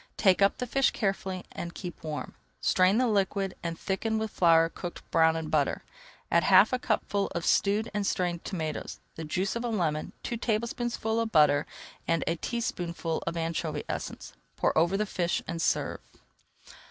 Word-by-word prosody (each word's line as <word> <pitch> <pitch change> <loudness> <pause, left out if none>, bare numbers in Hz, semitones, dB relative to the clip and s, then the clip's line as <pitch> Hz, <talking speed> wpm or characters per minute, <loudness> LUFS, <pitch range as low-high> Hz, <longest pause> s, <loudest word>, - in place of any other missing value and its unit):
Take 190 -2 +4
up 195 - +4
the 250 - -2
fish 270 +2 +2
carefully 190 -2 -2
and 170 0 -6
keep 180 -3 -7
warm. 155 -2 -5 0.3
Strain 185 +3 +3
the 255 - +3
liquid 195 -2 0
and 165 -1 -4
thicken 220 +5 -1
with 220 -1 -2
flour 165 -2 +5
cooked 175 +1 -8
brown 160 0 +4
in 160 -1 -3
butter. 150 -3 +1 0.5
Add - - +4
half - - +6
a 255 - +1
cupful 205 -4 0
of 170 - -2
stewed 210 +3 +2
and 210 -1 0
strained 175 -3 -1
tomatoes, 160 -5 -4
the 165 - -7
juice 185 +7 -1
of 235 - -2
a 240 - -1
lemon, 165 -8 -1
two 235 - -3
tablespoonfuls 230 0 -1
of 225 -1 -2
butter, 150 -2 +4 0.4
and 165 -1 +1
a 165 - 0
teaspoonful 170 -6 -3
of 165 0 -2
anchovy 165 0 -2
essence. - - -5 0.2
Pour - - +1
over 170 +4 +3
the 210 - +1
fish 175 -3 -1
and 170 -1 -3
serve. - - 0
185 Hz, 175 wpm, -29 LUFS, 165-215 Hz, 0.5 s, half